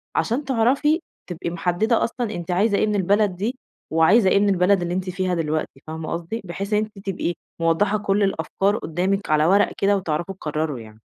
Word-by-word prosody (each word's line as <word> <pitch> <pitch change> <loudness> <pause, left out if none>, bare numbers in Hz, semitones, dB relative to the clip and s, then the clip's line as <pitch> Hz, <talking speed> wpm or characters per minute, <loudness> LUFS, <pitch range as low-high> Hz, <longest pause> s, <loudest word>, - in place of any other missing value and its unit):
عشان 260 +5 0
تعرفي 275 +6 +2 0.3
تبقي 170 0 -4
محدّدة 175 +7 +1
أصلًا 235 -2 -2
أنتِ 175 0 -5
عايزة 200 +3 +2
إيه - - +2
من 210 - 0
البلد 200 0 +2
دي 220 +8 -2 0.4
وعايزة 185 +6 +5
إيه 200 - +4
من 205 0 +3
البلد 185 0 +3
اللي 175 0 -2
أنتِ 185 0 -2
فيها 185 0 -1
دلوقتي 155 -3 -2
فاهمة 160 0 -5
قصدي؟ 170 +7 -4
بحيث 195 +4 -4
إن 210 - +4
أنتِ 215 -2 -5
تبقي 175 -2 -1 0.3
موضّحة 190 +6 +2
كل 200 0 +1
الأفكار 195 +3 0
قُدّامِك 185 +3 -1
على 155 0 +3
ورقة 200 +4 +3
كده 200 0 +3
وتعرفوا 175 +1 -3
تقرّروا 150 -5 -3
يعني. 110 -1 -13
190 Hz, 190 wpm, -22 LUFS, 170-210 Hz, 0.4 s, وعايزة